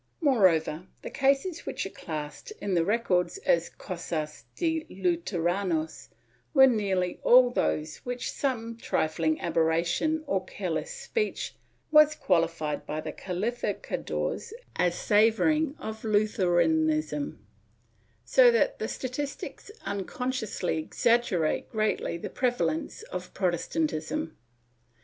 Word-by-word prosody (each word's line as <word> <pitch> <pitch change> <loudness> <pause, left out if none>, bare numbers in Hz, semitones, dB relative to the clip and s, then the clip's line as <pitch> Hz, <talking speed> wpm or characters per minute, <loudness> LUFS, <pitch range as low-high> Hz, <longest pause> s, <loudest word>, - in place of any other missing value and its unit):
Moreover, 185 - +3 0.2
the - - -6
cases 275 +6 +1
which - - -3
are 195 - -6
classed 150 - -6
in 200 - -2
the 170 -2 +3
records 200 - +1
as - - +3
cosas 155 -2 -5
de 320 -2 0
Luteranos 175 -2 -1 0.5
are 265 -1 +9
nearly 195 -7 +1
all 250 0 +6
those 155 -9 -1
in - - -22
which 245 0 -3
some 230 -4 -2
trifling 160 -6 0
aberration 170 - +1
or 285 - 0
careless - - -3
speech 465 -3 -2 0.4
was 305 0 +7
qualified 165 - 0
by 155 - -3
the 155 0 -4
calificadores 215 - -3 0.2
as 175 -1 +2
savoring 250 +9 +3
of 220 -6 -7
Luther 210 -3 +2
anism, 155 -3 +1 0.9
so 245 - +6
that 235 -2 +2
the 220 - -2
statistics 275 - -5 0.2
unconsciously 200 -2 -2
exaggerate 190 -2 +1
greatly 215 -5 -1
the - - -5
prevalence 265 - -1
of - - -6
Protestantism. 305 - -1
205 Hz, 110 wpm, -28 LUFS, 165-255 Hz, 0.9 s, are